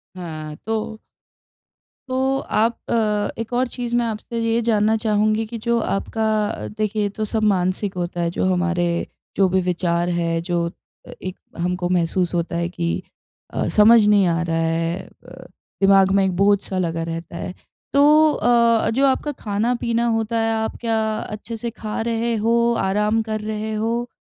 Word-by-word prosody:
हाँ, 155 -4 -6
तो 220 0 -3 1.1
तो 265 +1 +1
आप 230 -1 0
अ, 210 -3 +1
एक 230 +2 -7
और 250 +1 +2
चीज़ 240 0 -4
मैं 240 0 +2
आपसे 230 +1 -4
ये 230 0 +1
जानना 215 0 +3
चाहूँगी 215 0 +1
कि 230 +2 -6
जो 235 0 +3
आपका 220 +1 -2 0.2
अ, - - -5
देखिए 215 0 -2
ये 205 - 0
तो 215 - +1
सब 220 +1 -2
मानसिक 185 +1 -1
होता 175 0 -3
है, 170 - +1
जो 170 - -1
हमारे 180 -1 0 0.5
जो 195 - +4
भी 190 +1 +2
विचार 175 -1 0
हैं, 165 -1 0
जो 170 -1 0 0.4
अ, - - -9
एक 185 0 -6 0.2
हमको 175 +1 -1
महसूस 180 0 +1
होता 170 0 -1
है 170 0 -1
कि 170 -1 -2 0.6
अ, - - -1
समझ 220 +1 +7
नहीं 205 -2 +5
आ 170 0 +1
रहा 165 -1 -1
है 165 +2 0 0.3
अ, - - -11 0.4
दिमाग 195 -1 +5
में 200 - +4
एक 185 -2 -1
बोझ-सा 200 -1 +2
लगा 165 -2 -1
रहता 165 +1 -6
है। 180 - -5 0.4
तो 280 - +5 0.3
अ, 235 0 +3
जो 265 +5 +2
आपका 275 +2 +1
खाना-पीना 235 0 -1
होता 225 0 0
है, 225 0 +1
आप 220 0 -2
क्या 225 -1 0 0.3
अच्छे 215 +2 -6
से 235 +2 -3
खा 215 -1 -3
रहे 230 0 0
हो? 235 +2 +2
आराम 210 +3 +1
कर 215 0 -1
रहे 215 0 -3
हो? 230 +3 -1
210 Hz, 175 wpm, -21 LUFS, 180-230 Hz, 1.1 s, समझ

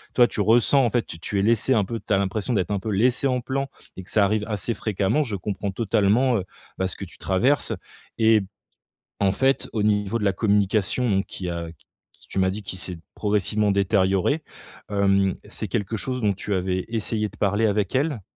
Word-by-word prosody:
toi 120 - +7
tu 105 - -3
ressens, 120 +6 +4
en 120 - +2
fait, 120 0 +1
t 80 - -9
tu 100 +4 -3
es 100 - +2
laissé 115 +4 +3
un 105 -3 +2
peu 115 +3 -4
tu - - -7
as 100 - +5
l'impression 100 +5 -1
d'être 95 -3 0
un 100 - 0
peu 110 - -5
laissé 120 +7 +3
en 125 -1 +1
plan 135 +2 -3 0.3
et - - -7
que 90 - -12
ça 105 -2 +4
arrive 105 +1 0
assez 110 +1 -1
fréquemment. 105 +8 0
Je 110 -6 -4
comprends 100 +1 -3
totalement, 115 +4 +2
heu, 95 - -2 0.4
bah 95 - +1
ce 90 - -2
que 100 - -7
tu - - -13
traverses 120 +9 +1 0.4
et 110 -1 +4 0.8
en 100 -1 +3
fait, 135 +6 +1
au 110 - 0
niveau 105 +1 +1
de 105 - -4
la 100 - +2
communication 105 +3 +1
donc 95 -1 +1
qui 90 -2 -6
a 85 -1 -4 0.4
qui - - -22
tu - - -6
m'as 95 0 +3
dit 105 +3 -5
qui 95 -1 -6
s'est 90 -2 -2 0.2
progressivement 105 0 +1
détérioré, 100 - +1 0.5
hem, 100 -1 +2
c'est - - -1
quelque 105 +3 -2
chose 125 +4 -3
dont 105 -2 +2
tu 100 +2 -4
avais 95 0 -1
essayé 110 -1 -1
de 105 - -17
parler 105 +2 +1
avec 105 -1 0
elle? 140 -3 0
105 Hz, 215 wpm, -24 LUFS, 95-115 Hz, 0.8 s, toi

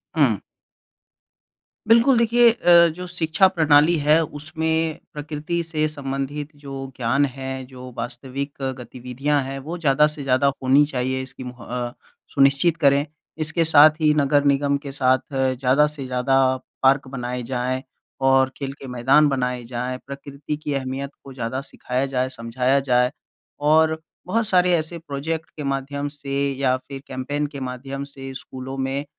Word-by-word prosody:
हुँ। 130 - +3 1.5
बिल्कुल, 235 +3 +5
देखिए 235 +1 +5
अ, 175 -6 +6
जो 180 - -6
शिक्षा 175 +2 +2
प्रणाली 160 -2 +4
है, 155 +2 +6
उसमें 160 +2 -1
प्रकृति 150 +3 -3
से 155 -2 -1
संबंधित 140 0 -4
जो 140 - -8 0.3
ज्ञान 130 +4 +2
है, 130 0 -5
जो 125 -1 -11
वास्तविक 130 +4 -5 0.2
गतिविधियाँ 130 +4 -2
हैं, 135 +1 -5
वो 160 +6 -6
ज़्यादा 150 -2 +3
से 145 - -6
ज़्यादा 130 +1 +2 0.2
होनी 135 +3 +5
चाहिए, 130 -1 -2
इसकी 130 0 -10
मुह 125 -1 -9
अ, 120 -1 -4 0.4
सुनिश्चित 140 +4 +3
करें। 140 -2 +3 0.4
इसके 165 +2 0
साथ 155 -1 +8
ही, 150 -1 +4
नगर 145 -1 +3
निगम 140 0 +2
के 140 - -5
साथ 130 -1 +2
ज़्यादा 130 +2 +2
से 135 - -6
ज़्यादा 130 +1 0 0.5
पार्क 135 +1 +4
बनाए 125 -1 -4
जाएँ 130 +1 -2 0.5
और 135 0 +4
खेल 135 -1 -4
के 135 - -9
मैदान 130 +5 +4
बनाए 125 -2 -1
जाएँ, 125 +2 -4
प्रकृति 140 +1 -6
की 150 -1 -4
अहमियत 135 +1 -3
को 135 - -11
ज़्यादा 130 +1 -3
सिखाया 130 +2 -2
जाए, 130 -1 -1
समझाया 125 +2 0
जाए, 125 +1 +3 0.5
और 160 +1 +3 0.3
बहुत 220 +3 +1
सारे 180 -1 +4
ऐसे 160 +2 -4
प्रोजेक्ट 160 +1 -4
के 150 - -6
माध्यम 140 +1 -2
से 140 -1 -7 0.3
या 130 -2 +2
फिर 135 -1 -7
कैंपेन 145 +3 -3
के 140 - -4
माध्यम 135 +2 -6
से 135 -1 -7
स्कूलों 130 +1 -7
में 135 +2 -2
140 Hz, 150 wpm, -22 LUFS, 130-150 Hz, 1.5 s, साथ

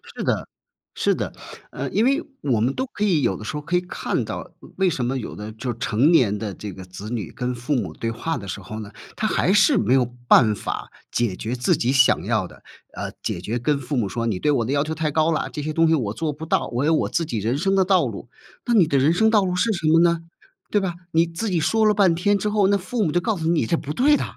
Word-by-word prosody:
是 - - -4
的， - - -1 0.5
是 - - +1
的。 - - -4 0.4
呃， - - -4
因 220 - +2
为 275 +5 +2 0.2
我 125 -6 +1
们 120 +5 +1
都 260 - -2
可 210 - -2
以 180 -8 +3
有 115 -7 +1
的 - - -9
时 105 - -5
候 150 - -3
可 165 +4 -2
以 180 - +3
看 180 - -2
到， - - -6 0.3
为 190 -1 +3
什 130 -7 -2
么 130 +2 -1
有 125 - -6
的 105 +1 -7
就 120 +3 -4
是 115 - -8
成 125 +6 +2
年 120 - +4
的 105 -2 -4
这 105 +2 -7
个 95 - -9
子 90 +4 -9
女 110 -7 -4
跟 125 0 -3
父 125 +5 -2
母 125 - -2
对 115 - -3
话 140 +7 -3
的 100 -4 -8
时 100 +2 -5
候 110 +4 -7
呢， 105 -2 -8 0.2
他 215 - -1
还 185 - +1
是 220 +6 +5
没 130 - +2
有 130 -2 +4 0.2
办 110 -4 +6
法 - - -5 0.2
解 120 -6 0
决 115 +6 -4
自 125 0 +2
己 120 - 0
想 135 -2 +4
要 - - 0
的， - - -17 0.3
呃， - - -5
解 85 - -3
决 110 +6 -3
跟 145 +4 +1
父 140 +2 -4
母 110 -5 +1
说： 115 +2 -3
“你 100 -5 -1
对 150 - +2
我 120 -5 +1
的 125 - -3
要 140 0 +2
求 160 +1 -4
太 155 -1 -1
高 155 +2 +2
啦， 155 - -1
这 150 - -5
些 155 +1 -3
东 165 +1 +3
西 160 - +4
我 110 -9 -2
做 155 +4 -2
不 155 +3 -8
到， - - +1
我 125 +4 0
有 160 - +3
我 - - 0
自 165 - 0
己 120 -7 -3
人 115 +6 0
生 195 +5 +1
的 190 -1 +3
道 190 0 +3
路。” - - -6 0.4
那 240 - +1
你 195 -8 +5
的 140 - +1
人 140 +5 +4
生 220 +5 +3
道 215 -3 +4
路 180 -1 -1
是 225 +5 +1
什 170 -5 -2
么 160 +1 +5
呢？ 170 -1 +3 0.5
对 210 - +3
吧？ 190 -3 -2 0.2
你 165 +1 +4
自 170 +7 -4
己 180 -3 +1
说 220 +8 +2
了 210 - +5
半 195 -5 +4
天 205 +5 +2
之 200 - -2
后， 205 -2 +3
那 200 +1 +3
父 210 +5 -2
母 160 - 0
就 175 - +2
告 220 +4 -1
诉 160 -1 -2
你 165 -7 +2
这 170 - +1
不 150 -3 -5
对 280 - +4
的， - - -1
150 Hz, 305 characters per minute, -23 LUFS, 120-180 Hz, 0.5 s, 办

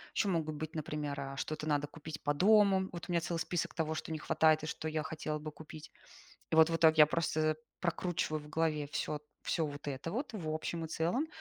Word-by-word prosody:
еще 205 - +2
могут 160 -5 0
быть, 155 +2 -5
например, 150 -2 -3
а, 135 0 -6
что-то 155 +3 -3
надо 145 -1 +1
купить 155 0 -8
по 145 - +2
дому. 195 +2 +5
Вот, 170 -2 -7
у - - -4
меня 170 -1 +2
целый 170 0 -2
список 170 -2 -1
того, 160 -2 0
что 160 - -5
не 160 - -1
хватает 155 0 +3
и - - -3
что 155 +2 -4
я 155 0 -1
хотела 155 -1 -3
бы 155 0 -6
купить. 155 0 -11 0.6
И - - +3
вот, 160 0 +8
в 165 - +1
итоге 160 -1 +5
я - - +8
просто 155 -1 +1 0.2
прокручиваю 170 -3 -1
в 150 - -12
голове 155 -2 0
всё 150 0 -2 0.2
всё 165 - 0
вот 145 -1 -6
это 140 +3 -3
вот, 245 +6 -3
в 180 -8 -5
общем 160 +1 -2
и 160 - -5
целом. 175 - 0
155 Hz, 225 wpm, -33 LUFS, 150-170 Hz, 0.6 s, вот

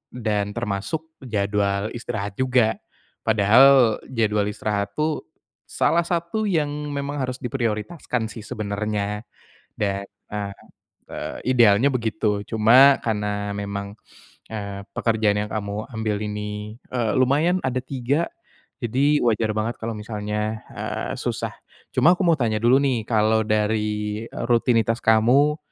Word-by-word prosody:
dan 105 -3 -1
termasuk 120 +9 -3
jadwal 100 -3 -1
istirahat 110 -3 -5
juga. 125 -4 +2 0.4
Padahal 115 +3 +5
jadwal 105 -4 +1
istirahat 100 -1 -2
tuh 155 0 -1 0.4
salah 170 +3 +2
satu 170 +5 -1
yang 155 -5 +1 0.2
memang 140 0 -3
harus 130 -1 -3
diprioritaskan 120 +1 -2
sih 115 - -8
sebenernya 105 -1 -3 0.5
dan, 100 -1 -2 0.3
ah, 100 -1 -3 0.5
eee, - - -6 0.2
idealnya 120 +3 +5
begitu. 110 -3 0
Cuma 125 +7 +6
karena 105 -2 -2
memang, 100 0 -5 0.6
eee, 100 -2 -5
pekerjaan 110 -3 +1
yang - - -13
kamu 105 0 -4
ambil 110 -2 -2
ini, 105 +1 -5 0.2
eee, 120 -4 0
lumayan 150 +8 +3
ada 130 0 -1
3, 135 +4 -1 0.5
jadi 140 +6 +2
wajar 110 -1 +2
banget 110 +2 -1
kalau 115 +1 -3
misalnya, 105 0 -3
eee, - - -4
susah. - - -2 0.4
Cuma 175 +3 +5
aku 185 - -3
mau 170 -4 +3
tanya 110 -3 0
dulu 125 +3 +5
nih 135 -5 +1
kalau 110 -1 +3
dari, 105 0 -1
eee, - - -5
rutinitas 115 -1 +2
kamu 125 +7 +4
110 Hz, 125 wpm, -23 LUFS, 105-130 Hz, 0.6 s, Cuma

